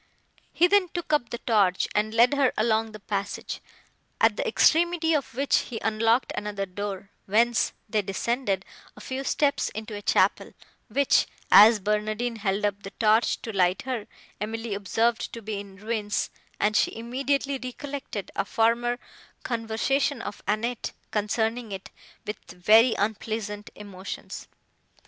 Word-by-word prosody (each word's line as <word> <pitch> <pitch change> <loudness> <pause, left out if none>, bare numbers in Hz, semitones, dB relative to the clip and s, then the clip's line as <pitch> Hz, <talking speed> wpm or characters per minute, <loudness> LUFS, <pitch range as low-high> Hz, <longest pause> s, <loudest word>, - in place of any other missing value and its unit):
He 345 - +4
then 390 +1 +4
took 345 -3 -3
up 270 -6 +2
the 235 - -4
torch, 200 -6 +2
and 215 +1 +1
led 235 +4 +5
her 280 -3 +3
along 220 0 +1
the 215 - -10
passage, 200 0 -4 0.6
at - - +4
the - - -2
extremity 340 -5 +3
of 285 -6 -1
which 275 +2 +2
he 230 -3 -5
unlocked 225 +3 +2
another 205 -1 -3
door, 195 +1 -6 0.2
whence 230 +4 +3 0.2
they 215 0 +1
descended, 195 0 -1 0.3
a - - -10
few 260 +5 -4
steps, 285 +1 +1
into 215 +1 -7
a 205 - -6
chapel, - - +2 0.3
which, 280 -1 +3 0.2
as 215 +2 +9
Barnardine 215 +3 -1
held 200 -1 0
up 205 0 -1
the 195 - -7
torch 220 +1 +3
to 225 - -4
light 185 -1 +2
her, 250 -5 -4 0.3
Emily 225 +1 -3
observed 225 +4 0
to 230 - -6
be 210 -1 -3
in 200 -1 -10
ruins, 210 0 -2 0.3
and 210 0 +2
she - - +2
immediately 275 +4 -1
recollected 255 -4 -6
a - - +1
former 235 +3 +1 0.5
conversation 245 +4 0
of 205 - -7
Annette, 230 +3 -1 0.2
concerning 220 +2 -1
it, 190 -1 -7 0.3
with 210 -1 -5
very 215 +7 +5
unpleasant 210 0 -3
emotions. 200 -2 -8
220 Hz, 145 wpm, -26 LUFS, 205-245 Hz, 0.6 s, as